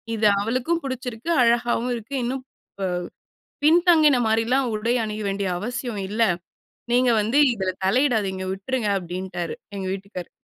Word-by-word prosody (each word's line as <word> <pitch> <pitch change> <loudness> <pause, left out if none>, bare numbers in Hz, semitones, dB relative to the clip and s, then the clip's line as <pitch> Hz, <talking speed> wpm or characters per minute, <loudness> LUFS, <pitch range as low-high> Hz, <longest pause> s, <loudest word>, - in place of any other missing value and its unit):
இது 215 -1 +3
அவளுக்கும் 255 +11 0
பிடிச்சிருக்கு, 255 +1 -5
அழகாவும் 240 +1 +2
இருக்கு. 235 +5 -6
இன்னும் 255 +2 -3 0.4
ப - - -6 0.8
பின்தங்கின 315 -4 +5
மாரிலாம் 235 +4 +2
உடை 230 +3 0
அணிய 215 0 -4
வேண்டிய 195 -1 -1
அவசியம் 240 0 -4
இல்ல. 220 +3 0 0.7
நீங்க 250 0 +4
வந்து 225 +6 0 0.2
இதுல 190 -3 -1 0.2
தலையிடாதீங்க. 210 -5 +1
விட்டுருங்க." 215 +2 -2
அப்படீன்ட்டாரு, 175 -1 -5 0.2
எங்க 190 -1 -4
வீட்டுக்காரரு. 195 -2 -8
230 Hz, 125 wpm, -23 LUFS, 200-255 Hz, 0.8 s, பின்தங்கின